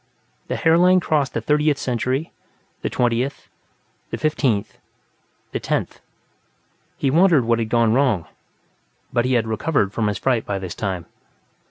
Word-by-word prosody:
The - - -2
hairline 180 +3 +4
crossed 150 -5 0
the - - 0
Thirtieth 150 -1 +2
Century, 130 +5 -2 0.5
the - - -2
Twentieth, 125 +3 -1 0.6
the - - -4
Fifteenth, 135 -9 0 0.7
the - - -2
Tenth. - - -2 1.0
He 135 - 0
wondered 165 -5 +4
what 115 0 +2
had 110 -1 -2
gone 115 -2 +3
wrong, 125 - +2 0.9
but 120 -1 +2
he 130 - +1
had 115 -3 +2
recovered 110 -2 0
from 110 -2 0
his 105 -1 -1
fright 125 -1 +1
by 100 - -3
this 95 -2 -5
time. 95 -7 -3
125 Hz, 145 wpm, -21 LUFS, 110-150 Hz, 1.0 s, hairline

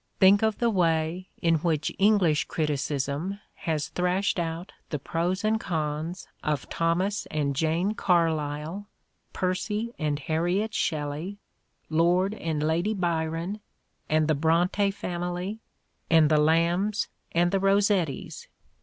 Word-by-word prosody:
Think 195 +1 +6
of 220 -1 +1
the 235 -1 +2
way 170 -1 0
in 165 -1 +4
which 160 -2 0
English 195 -7 +4
criticism 150 +4 -2
has 155 -3 -2
thrashed 180 +2 0
out 165 +2 -3 0.2
the 150 - -1
pros 170 +7 -2
and 220 +1 +2
cons 160 -1 -3 0.2
of 150 -3 -1
Thomas 180 +5 0
and 145 -2 -1
Jane 165 +7 +1
Carlyle, 165 0 0 0.4
Percy 210 +5 -2
and 150 -2 0
Harriet 175 +9 -1
Shelley, 155 +4 -2 0.5
Lord 175 +5 +2
and 160 -7 -2
Lady 170 +7 +1
Byron, 170 +2 -1 0.5
and 155 0 +3
the 155 - +3
Bronte 170 +6 +2
family 180 +1 -4 0.5
and 160 -2 +5
the 155 - +5
Lambs 170 +7 +2 0.2
and 175 +1 +2
the 195 - +2
Eossettis! 195 -5 +1
170 Hz, 120 wpm, -27 LUFS, 155-195 Hz, 0.5 s, Think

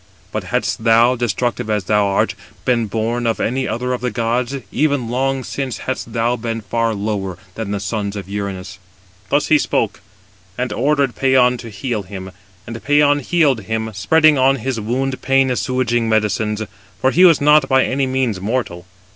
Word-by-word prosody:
But - - -3
hadst - - -2
thou, 115 +2 +5
destructive 120 -1 -2
as 105 -2 0
thou 105 +1 +2
art, 100 - +1 0.3
been 120 -3 +1
born 115 +3 -1
of 115 - 0
any 130 +3 -1
other 125 +2 -2
of 125 - -3
the 125 - -1
gods, 120 +3 -1 0.2
even 145 -6 0
long 135 +2 -1
since 130 -4 -4
hadst 130 -3 -4
thou 120 +1 +1
been 115 -1 -4
far 115 +1 -1
lower 100 -3 -3 0.2
than 110 -1 -5
the 100 0 -2
sons 100 +1 -3
of 100 -2 -6
Uranus." 100 -2 -5 0.5
Thus 145 +5 +1
he 155 - +5
spoke, 110 -6 -1 0.6
and 125 0 -2
ordered 140 -3 +1
Pæon 125 -2 +3
to 115 - -8
heal 110 +2 -3
him: 95 -1 -8 0.3
and 115 0 -8
Pæon 145 0 +3
healed 145 -4 +2
him, 110 +2 -3
spreading 150 +10 +4
[on 135 +1 +4
his 130 -1 -3
wound] 130 +5 -2
pain 135 0 +2
assuaging 120 -2 0
medicines; 105 0 0 0.4
for 130 +6 +2
he 180 - +4
was 170 -4 +7
not 150 -1 +4
by 130 -1 +4
any 135 0 0
means 130 -7 -1
mortal. 100 -5 -3
120 Hz, 175 wpm, -18 LUFS, 105-130 Hz, 0.6 s, was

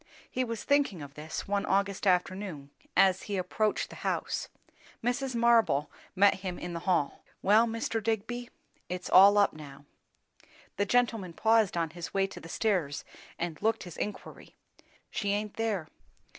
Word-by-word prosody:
He 255 - 0
was 230 -3 -4
thinking 280 - +1
of 140 -1 -10
this 155 +1 -6
one 200 0 0
August 200 +1 0
afternoon 180 -5 0 0.3
as 190 -1 +5
he 200 - -1
approached 215 +3 -1
the - - -10
house. - - -2 0.5
Mrs. 250 +2 -1
Marble 230 -11 +3 0.2
met 195 0 +5
him 185 -2 -4
in 175 0 -6
the 170 - -3
hall. 165 -6 +1 0.2
"Well, 215 +4 +5
Mr. 225 0 -2
Digby, 230 +3 -2 0.4
it's 180 0 -5
all 200 +2 +8
up 205 - +4
now!" 145 -2 -11 0.9
The 205 +1 +1
gentleman 225 -7 +1
paused 220 -2 +3
on 165 -2 0
his 175 +2 -8
way 195 0 +3
to 195 - -8
the 165 - -11
stairs 175 -9 0 0.3
and 170 -2 -4
looked 225 +1 +1
his 175 -3 -9
inquiry. 210 - -6 0.6
"She 200 -1 -1
aint 210 0 -2
there. 215 -8 -1
200 Hz, 155 wpm, -30 LUFS, 175-225 Hz, 0.9 s, all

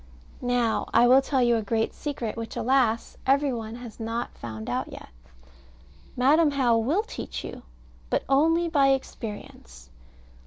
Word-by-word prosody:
Now 245 -2 0
I 235 +1 +6
will 260 +2 +7
tell 270 -2 +1
you 240 -1 +3
a - - -1
great 220 +1 -1
secret, 250 -7 -4
which, 230 -1 -6
alas! 245 -3 +1
every 275 0 +3
one 225 -1 -5
has 240 -2 -10
not 230 +1 -4
found 110 -2 -7
out - - -2
yet. - - -10 1.1
Madam 295 +5 +4
How 260 -5 +2
will 275 - +1
teach - - -7
you, - - -8 0.5
but - - 0
only 325 +5 +3
by 285 -4 +3
experience. 205 - -4
245 Hz, 150 wpm, -26 LUFS, 225-275 Hz, 1.1 s, will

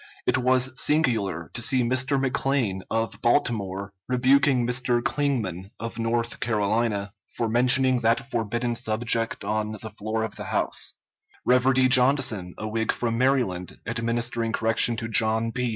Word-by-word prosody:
It - - +1
was 130 +1 +2
singular 110 - 0
to 120 - -2
see 130 -2 +1
Mr. 130 +3 +1
McLane, 135 -6 -1
of 115 -1 -2
Baltimore, 100 -6 0
rebuking 130 0 +3
Mr. 125 0 +1
Clingman, 110 - -2
of 115 0 -6
North 115 +1 -1
Carolina, 105 -2 -1 0.2
for 115 - 0
mentioning 125 +2 +4
that 120 +4 0
forbidden 120 +1 -2
subject 115 -1 -1
on 105 +1 -2
the 110 +1 -8
floor 110 +2 -3
of 110 - -6
the - - -6
House; - - -1 0.5
Reverdy 130 +1 +4
Johnson, 125 -8 +3
a 110 - -5
Whig 110 +1 -1
from 115 -1 -2
Maryland, 125 -9 0
administering 115 0 -1
correction 115 +1 +3
to 115 - -4
John 115 +1 +1
P. 125 +1 -2
115 Hz, 140 wpm, -25 LUFS, 110-125 Hz, 0.5 s, mentioning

